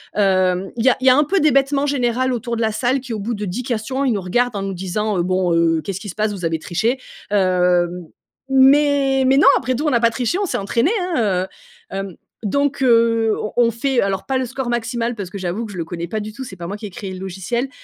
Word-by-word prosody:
hem, 185 -2 +2
il 230 - -2
y - - +7
a - - +2
il 260 - 0
y - - +10
a 255 - +6
un 295 - +4
peu 385 +7 +1
d'hébètement 280 -1 +2
général 255 -2 0
autour 235 0 -3
de - - -2
la 220 -1 +1
salle, 255 +4 +1
qui 250 -2 -7
au 215 - -3
bout 230 +4 -3
de 210 -1 -4
10 195 +7 -4
questions, 245 +3 -2
ils 255 - +2
nous 200 - -2
regardent 240 +6 0
en - - -3
nous 195 -1 -3
disant, 190 +3 -2
heu: 175 - +1
«Bon, 185 -1 +1
heu, 165 -1 +2
qu'est-ce 195 -1 -4
qui 205 - -7
se - - -7
passe 215 -1 0
vous 185 - -8
avez 160 -1 -1
triché?» 225 +12 -1 0.3
heu, 180 -3 +3 0.6
mais 270 0 +4
mais 265 +1 +4
non, 290 - +5
après 255 - -1
tout, 295 +6 -2
on - - +4
n'a 235 -3 +2
pas 230 - +5
triché, 250 +9 -1
on 410 - 0
s'est - - -2
entraînés, 230 - +1
hein, 225 - 0
heu 475 - -12
hem, 195 -3 -5 0.3
donc 280 +5 0
heu, 230 -2 +3
on 210 - -5
on 235 -1 +3
fait, 250 +2 0
alors 195 -1 -1
pas 265 -1 0
le 260 - -1
score 260 +1 -5
maximal 235 0 -2
parce 200 -5 -6
que 200 - -7
j'avoue 185 +5 -3
que 210 - -9
je - - -8
le 165 - -3
connais 170 0 -5
pas 215 - -2
du 210 0 -6
tout, 265 - -7
c'est 190 -7 -9
pas 170 - -6
moi 200 - -4
qui 210 - -8
ai - - -9
créé 190 0 -7
le 185 - -8
logiciel 195 +8 -3
230 Hz, 275 wpm, -20 LUFS, 190-260 Hz, 0.6 s, y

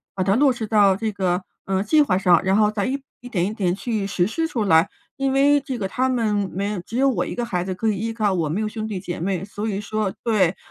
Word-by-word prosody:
把 185 - 0
它 195 - +2
落 275 +1 +4
实 230 -2 -4
到 205 -3 +4
这 220 +1 -2
个， 185 -2 0 0.2
呃， 190 0 0
计 300 +9 +4
划 185 -9 +1
上， 180 -3 +4
然 190 +1 +2
后 210 0 +4
再 205 -2 -1
一 270 +2 -2 0.3
点 180 -5 0
一 210 - -4
点 185 -5 0
去 215 -1 -2
实 180 -3 +1
施 325 +9 -1
出 235 -8 -2
来。 165 -2 +4 0.3
因 270 -1 0
为 285 +1 +4
这 265 -4 -5
个 195 - -1
他 255 +6 0
们 215 -5 0
没 200 +1 -2
只 230 - -8
有 275 +1 +4
我 255 - 0
一 - - -5
个 240 - -3
孩 180 -7 -2
子 185 0 -3
可 220 +5 -2
以 210 - +1
依 225 +3 -3
靠， 215 -3 +1
我 160 -4 -1
没 185 +8 -1
有 215 - -1
兄 215 0 -4
弟 200 -4 -4
姐 180 -2 -5
妹， 185 +1 -2
所 205 +2 -5
以 200 -1 -2
说 210 -1 -2
对， 195 -6 +2
210 Hz, 290 characters per minute, -22 LUFS, 190-230 Hz, 0.3 s, 落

